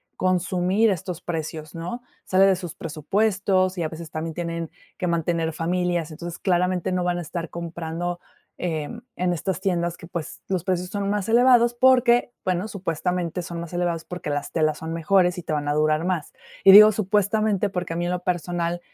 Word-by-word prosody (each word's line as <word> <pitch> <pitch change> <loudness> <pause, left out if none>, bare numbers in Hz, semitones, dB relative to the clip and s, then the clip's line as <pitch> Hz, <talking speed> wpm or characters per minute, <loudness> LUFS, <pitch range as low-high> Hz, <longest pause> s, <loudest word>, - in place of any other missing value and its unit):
consumir 185 +3 +2
estos 180 -1 -3
precios, 160 -2 -5
¿no? 175 +9 -5 0.2
Sale 190 +1 +4
de 195 -1 +4
sus 175 -2 -6
presupuestos 185 +3 0
y 170 - -1
a 155 - -1
veces 165 -1 -8
también 160 0 -4
tienen 170 -1 -4 0.3
que 180 - -2
mantener 165 -1 0
familias. 175 0 -1
Entonces, 170 +2 -7
claramente 180 -1 +1
no 180 -1 0
van 175 0 0
a - - -3
estar 170 0 -5
comprando, 170 +1 -4 0.4
eh, 160 -4 -2 0.3
en 180 0 0
estas 185 +3 -2
tiendas 175 -2 0
que, - - -11
pues, 170 -3 -6
los 185 -3 -1
precios 180 -1 -1
son 200 -1 -2
más 205 0 -1
elevados 240 0 +5
porque, 245 -1 +4
bueno, 185 +3 0
supuestamente 180 -2 -2
son 170 0 -6
más 170 +1 -7
elevados 175 -2 -1
porque 180 -4 -6
las 145 -1 -3
telas 155 -2 +1
son 160 0 -5
mejores 180 +2 +2
y - - -8
te - - -5
van 145 -1 -1
a 145 - +1
durar 155 +2 +2
más. 180 -5 -2 0.3
Y 195 - +9
digo, 215 +2 +10
supuestamente, 205 0 +1
porque 180 -3 -3
a - - -5
mí 175 +1 -1
en 175 - -1
lo 180 0 -3
personal 175 -1 -1
175 Hz, 190 wpm, -24 LUFS, 165-190 Hz, 0.4 s, digo